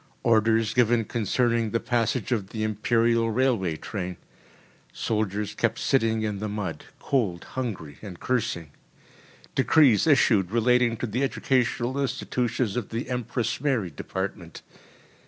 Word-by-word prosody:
Orders 110 -1 +3
given 120 -2 +3
concerning 115 +1 0
the 115 - 0
passage 120 0 -1
of 105 -5 -1
the 110 -1 -3
Imperial 115 +2 +2
railway 115 -8 +1
train. 90 -1 -5 0.7
Soldiers 105 -1 -2
kept 115 +2 0
sitting 115 -5 +1
in 105 -2 -2
the 105 +1 -3
mud 100 -5 -4
cold, 105 -11 -1
hungry, 105 - -5
and 95 -5 -9
cursing. 85 - -2 0.8
Decrees 135 -3 +4
issued 110 - +4
relating 120 +1 +2
to 125 - -3
the 120 +3 -2
educational 130 -1 0
institutions 125 -4 -1
of 125 -4 -3
the 115 +3 -4
Empress 120 -1 -2
Mary 125 - 0
Department. - - -6
115 Hz, 125 wpm, -26 LUFS, 105-125 Hz, 0.8 s, Decrees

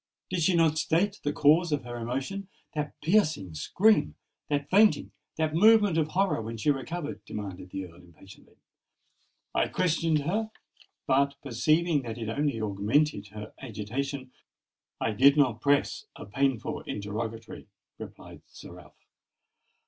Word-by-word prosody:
did 180 -2 0
she 180 +3 +3
not 160 -2 +3
state 195 +7 +1
the 145 - -1
cause 155 +4 +4
of 145 -3 0
her 120 0 -7
emotion—that 150 +5 -5
piercing 155 - +1
scream—that 145 - 0
fainting—that 185 -5 +1
movement 210 +1 +5
of 160 -2 +2
horror 190 -3 0
when 115 +1 -6
she 145 +7 +2
recovered?" 150 +3 -5
demanded 95 -3 -7
the 95 +1 -5
Earl, 85 -1 -15
impatiently. 90 +3 -17 1.0
"I - - +2
questioned 165 -3 +1
her; 215 +8 -1 0.6
but, 140 +1 +2
perceiving 150 +5 +2
that 115 -2 -6
it 115 -2 -4
only 140 0 -1
augmented 105 +3 0
her 105 +1 -9
agitation, 130 +4 -5 0.7
I 115 - 0
did 140 +7 +5
not 125 -6 +2
press 145 0 +1
a - - -9
painful 135 +2 -1
interrogatory," 110 +2 -5 0.3
replied - - -11
Sir - - -12
Ralph. - - -16
140 Hz, 130 wpm, -28 LUFS, 110-160 Hz, 1.0 s, movement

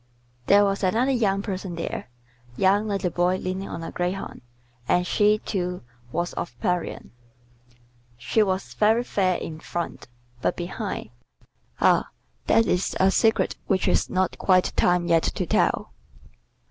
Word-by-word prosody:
There 205 +1 +6
was 195 0 -1
another 225 +8 +2
young 200 -6 +1
person 190 -3 -4
there, 165 -6 -5 0.5
young 200 +3 +3
like 200 -2 -1
the 180 - 0
boy 175 +2 +2
leaning 185 +1 -4
on 165 - -6
a - - -6
greyhound, 180 +2 -3 0.5
and 180 0 +2
she, 210 +2 +3
too, 180 - -3 0.3
was 175 +4 -2
of 120 -8 -6
Parian: 180 - -2 1.1
she 130 - +1
was 190 -2 -1
very 220 +3 +3
fair 185 -6 +1
in 155 -1 -6
front, 170 +1 -5 0.3
but - - 0
behind 180 - -5 0.7
ah, - - +3 0.4
that 225 0 +4
is 180 +1 0
a 190 +1 +4
secret 220 +2 +2
which 190 -2 +1
is - - +2
not 185 0 0
quite 185 -2 +3
time 175 -1 +3
yet 165 -1 +3
to - - -2
tell. - - +1
185 Hz, 145 wpm, -25 LUFS, 175-205 Hz, 1.1 s, There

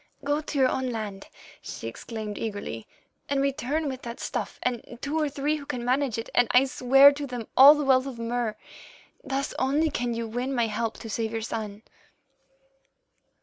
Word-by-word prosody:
"'Go 290 +1 0
to 305 -1 -5
your 265 -1 +5
own 260 0 -1
land,' 210 -4 -5 0.3
she - - -7
exclaimed 215 - -6
eagerly, 205 - -5 0.4
'and 280 -1 +1
return 280 +3 -1
with 260 -1 -4
that 235 0 -7
stuff - - -4
and 240 -1 -3
two 295 +4 -2
or 300 -2 +1
three 290 +2 -1
who 285 - -9
can 245 -1 -4
manage 255 -1 +1
it, 230 - -4
and 245 - +4
I 255 +2 +5
swear 270 +2 +6
to 285 0 -5
them 245 -3 -6
all 280 +3 +10
the 295 -1 -2
wealth 260 0 +4
of 260 -3 -6
Mur. 230 -2 -2 0.7
Thus 275 0 -2
only 295 +4 +2
can 245 -4 -2
you 230 0 -3
win 250 +4 -3
my 235 -2 +2
help 225 +1 -2
to 230 - -7
save 220 +1 -2
your 225 0 -3
son. 215 -2 -5
250 Hz, 190 wpm, -26 LUFS, 230-275 Hz, 0.7 s, all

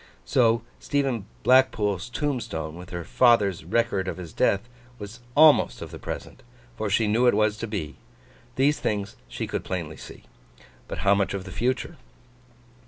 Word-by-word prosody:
So, 115 -3 +3 0.2
Stephen 135 -8 -1 0.2
Blackpool's 115 -6 +3
tombstone, 120 - -3
with 90 +1 -10
her 85 -1 -5
father's 105 -5 +3
record 100 0 0
of - - -3
his 85 -4 -8
death, 100 +4 +1 0.3
was 105 +3 -9 0.2
almost 155 -1 +6
of - - -8
the - - -9
Present, - - -7 0.3
for 110 -1 -2
she 110 +3 +2
knew 115 +4 +3
it 120 - +4
was 105 0 +2
to 115 - -4
be. 80 -8 -5 0.6
These 145 +3 +2
things 100 -1 -2
she - - -4
could - - -4
plainly 85 -5 -4
see. - - -12 0.6
But, - - -5
how 100 - +6
much 100 0 0
of 95 - -4
the 95 - -9
Future? 125 +5 -2
105 Hz, 165 wpm, -25 LUFS, 95-120 Hz, 0.6 s, almost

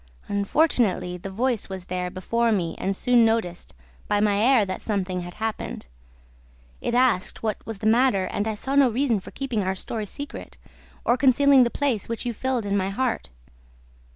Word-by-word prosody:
Unfortunately, 200 - +1
the 185 +2 -7
voice 230 +2 -1
was 190 -2 -6
there 180 0 -3
before 230 +6 0
me 175 -6 0
and 195 +1 -1
soon 245 +3 +4
noticed, 225 - -1 0.3
by 205 - +1
my 205 -1 +2
air, 235 -1 +4
that 185 -1 -5
something 190 -4 -2
had 175 0 -8
happened. 220 0 -4 1.0
It 240 - -1
asked 245 -7 +1
what 215 -2 -2
was 225 -2 -4
the 215 - -7
matter 220 -3 +3
and 205 - -2
I 220 - -1
saw 265 +6 -4
no 280 -2 +5
reason 240 -2 +1
for - - -11
keeping 255 -6 -2
our 190 0 -1
story 215 +2 -5
secret 285 +8 -8 0.5
or 240 - +3
concealing 270 0 +5
the - - +1
place 250 -7 -1
which 230 +1 -4
you 240 - -1
filled 255 0 -1
in 200 0 0
my 190 -1 0
heart. 235 - -2
220 Hz, 180 wpm, -24 LUFS, 195-250 Hz, 1.0 s, no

